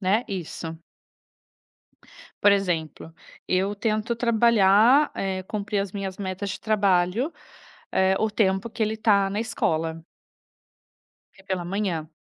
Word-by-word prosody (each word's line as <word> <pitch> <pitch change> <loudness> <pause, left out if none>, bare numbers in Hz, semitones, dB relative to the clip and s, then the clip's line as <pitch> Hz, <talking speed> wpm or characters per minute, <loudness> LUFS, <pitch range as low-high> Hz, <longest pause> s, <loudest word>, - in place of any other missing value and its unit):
né, 200 +4 +2
isso. 165 -3 -6 1.7
Por 205 - +7
exemplo, 165 -4 -2 0.3
eu 190 +2 +1
tento 215 +2 -1
trabalhar, 235 +3 +4
eh, 190 -1 -3
cumprir 205 0 -3
as 195 -1 -4
minhas 195 -2 -5
metas 195 0 -4
de - - -5
trabalho, 205 - +1 0.6
eh, 190 0 +3
o 220 - +1
tempo 195 0 +1
que 225 - -2
ele 220 +1 -1
está 200 -3 +2
na 205 - -2
escola. 165 -7 -2 1.3
É 195 - -19
pela 185 -3 -3
manhã. 180 -5 -2
195 Hz, 125 wpm, -24 LUFS, 185-215 Hz, 1.7 s, Por